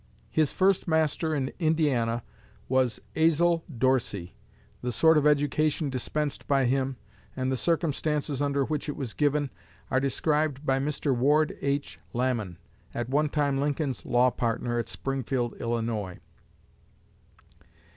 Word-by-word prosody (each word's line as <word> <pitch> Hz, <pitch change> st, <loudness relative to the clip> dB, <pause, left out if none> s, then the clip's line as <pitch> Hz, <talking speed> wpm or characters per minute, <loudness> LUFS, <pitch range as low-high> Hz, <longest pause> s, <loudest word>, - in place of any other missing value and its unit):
His 155 Hz, -3 st, +2 dB
first 190 Hz, -1 st, +2 dB
master 160 Hz, 0 st, +1 dB
in 135 Hz, -2 st, -2 dB
Indiana 140 Hz, -8 st, +1 dB, 0.4 s
was 130 Hz, -2 st, +1 dB, 0.2 s
Azel 165 Hz, +1 st, +3 dB
Dorsey. 115 Hz, -8 st, 0 dB, 0.5 s
The 125 Hz, -, -2 dB
sort 160 Hz, +8 st, +5 dB
of 150 Hz, -1 st, +4 dB
education 150 Hz, 0 st, +2 dB
dispensed 145 Hz, +3 st, -3 dB
by 135 Hz, -2 st, +3 dB
him, 130 Hz, +1 st, 0 dB, 0.4 s
and 130 Hz, 0 st, -1 dB
the -, -, +1 dB
circumstances 150 Hz, -2 st, 0 dB
under 140 Hz, -1 st, +1 dB
which 150 Hz, 0 st, -3 dB
it 145 Hz, -, -3 dB
was 130 Hz, -6 st, -4 dB
given, 145 Hz, -1 st, +1 dB, 0.4 s
are 130 Hz, -, +3 dB
described 150 Hz, +1 st, 0 dB
by 135 Hz, -1 st, +2 dB
Mr. 140 Hz, -1 st, 0 dB
Ward 145 Hz, +5 st, +3 dB
H. 140 Hz, +1 st, -2 dB
Lamon, 120 Hz, -8 st, -1 dB, 0.4 s
at 120 Hz, 0 st, -3 dB
one 150 Hz, +3 st, +2 dB
time 140 Hz, -2 st, +1 dB
Lincoln's 145 Hz, -1 st, -1 dB
law 125 Hz, +1 st, +3 dB
partner 120 Hz, 0 st, -1 dB
at 115 Hz, -, -3 dB
Springfield, 130 Hz, -3 st, -2 dB
Illinois. 115 Hz, -5 st, -2 dB
140 Hz, 130 wpm, -27 LUFS, 125-150 Hz, 0.5 s, sort